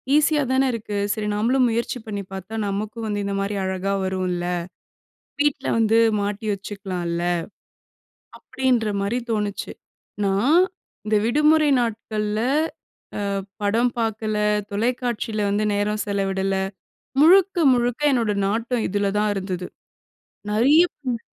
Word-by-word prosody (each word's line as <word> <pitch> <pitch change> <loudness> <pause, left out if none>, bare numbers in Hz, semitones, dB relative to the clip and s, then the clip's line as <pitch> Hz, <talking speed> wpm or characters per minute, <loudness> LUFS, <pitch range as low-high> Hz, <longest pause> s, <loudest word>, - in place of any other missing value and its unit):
ஈஸியா 300 0 +3
தானே 265 +1 +3
இருக்கு. 210 -2 -4 0.2
சரி, 215 -2 -3
நாமளும் 250 +5 +2
முயற்சி 235 +2 -1
பண்ணி 205 -2 -4
பார்த்தா, 190 +3 -7
நமக்கும் 215 +3 -3
வந்து 205 -1 -2
இந்தமாரி 200 +1 -2
அழகா 190 +1 -1
வரும்ல. 185 -2 -2 1.0
வீட்ல 290 -1 +1
வந்து 225 0 +3 0.2
மாட்டி 205 +2 -3
வச்சுக்கலான்ல. 185 -4 -4 1.2
அப்பிடின்றமாரி 225 -3 0
தோணுச்சு. 210 -2 -2 0.5
நான் 220 - +3 0.5
இந்த 215 0 +1
விடுமுறை 300 +4 +4
நாட்கள்ல 215 -2 -2 1.0
அ - - -4 0.2
படம் 230 +4 +2
பார்க்கல, 220 -1 -1 0.3
தொலைக்காட்சியில 225 -1 -1
வந்து 210 +1 +1
நேரம் 210 +1 0
செலவிடல. 195 -1 0 0.7
முழுக்க, 380 +4 +6 0.2
முழுக்க 245 +1 0
என்னுடைய 225 -5 +1
நாட்டம் 230 +2 -1
இதில 200 +1 0
தான் 210 0 +2
இருந்தது. 185 -2 -4 0.8
நெறைய 265 +10 +5 0.3
ம். 235 - -2
215 Hz, 110 wpm, -23 LUFS, 200-240 Hz, 1.2 s, முழுக்க